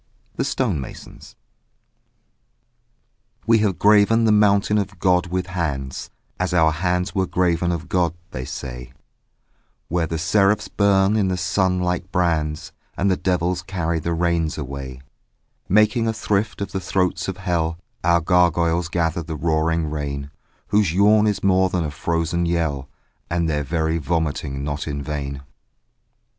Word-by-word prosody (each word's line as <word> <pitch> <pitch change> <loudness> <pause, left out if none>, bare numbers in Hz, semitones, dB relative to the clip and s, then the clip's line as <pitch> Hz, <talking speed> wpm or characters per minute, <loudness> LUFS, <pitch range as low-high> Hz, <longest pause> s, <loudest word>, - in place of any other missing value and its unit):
THE - - -1
STONE 75 - -1
MASONS - - -11 2.1
We 115 0 +4
have 105 -4 +1
graven 105 +2 +5
the 110 - +4
mountain 105 0 +3
of 95 -2 -4
God 90 0 +2
with 90 0 -2
hands, 75 -8 -4 0.3
As 90 -1 0
our 80 -2 +4
hands 90 +3 -1
were 95 -2 0
graven 85 -1 +1
of 85 -1 -4
God, 85 -3 +1 0.2
they 65 - -5
say, 60 -1 -7 1.0
Where 85 0 0
the 80 - -3
seraphs 100 +5 +2
burn 100 0 +3
in 105 -3 +2
the 90 -1 -1
sun 90 +1 +1
like 90 +1 -2
brands 80 -4 0 0.3
And 100 +2 +2
the - - +3
devils 90 -1 0
carry 85 -3 -2
the 85 +2 -2
rains 85 -2 0
away; 70 -2 -6 0.7
Making 105 +4 +3
a 110 - +1
thrift 105 -1 -1
of 100 - -3
the 95 - -2
throats 90 -1 -1
of 95 -1 -4
hell, 85 -4 -1 0.3
Our 85 0 +3
gargoyles 85 0 +2
gather 85 0 -1
the 80 0 -6
roaring 80 +1 0
rain, 70 -2 -4 0.4
Whose 100 -5 +2
yawn 105 +2 +5
is 105 - -1
more 95 -1 +3
than 90 -2 -1
a 75 - -3
frozen 85 +2 -1
yell 80 -6 -1 0.4
And 85 -1 0
their 75 -2 0
very 80 +2 -1
vomiting 75 -3 -2
not 75 +1 -3
in 70 -1 -3
vain. 70 -2 -4
85 Hz, 150 wpm, -22 LUFS, 80-95 Hz, 2.1 s, graven